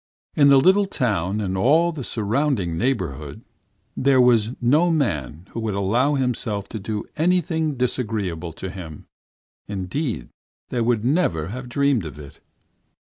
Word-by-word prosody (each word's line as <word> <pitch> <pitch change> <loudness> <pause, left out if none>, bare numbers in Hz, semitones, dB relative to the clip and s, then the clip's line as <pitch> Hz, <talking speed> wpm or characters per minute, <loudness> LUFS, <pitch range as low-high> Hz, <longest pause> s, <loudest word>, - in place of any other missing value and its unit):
In 140 -1 +6
the 140 -1 +7
little 190 +7 +4
town 105 - -1
and 95 -3 -2
all 155 - +3
the 150 -5 -6
surrounding 110 - -1
neighborhood 90 - -3 0.5
there 135 0 +3
was 120 -3 +4
no 150 +8 +3
man 85 - -1
who - - -5
would 110 -3 -2
allow 120 +9 +2
himself 115 -6 -1
to 110 - -5
do 105 +1 -4
anything 160 -2 +1
disagreeable 105 -9 -2
to 95 +3 -6
him; 85 -6 -9 0.6
indeed, 100 - -3 0.4
they 120 - -1
would 115 -1 +1
never 110 - +1
have 125 +3 -7
dreamed 140 -6 +1
of 75 -2 -8
it. 70 -2 -12
115 Hz, 140 wpm, -22 LUFS, 95-140 Hz, 0.6 s, the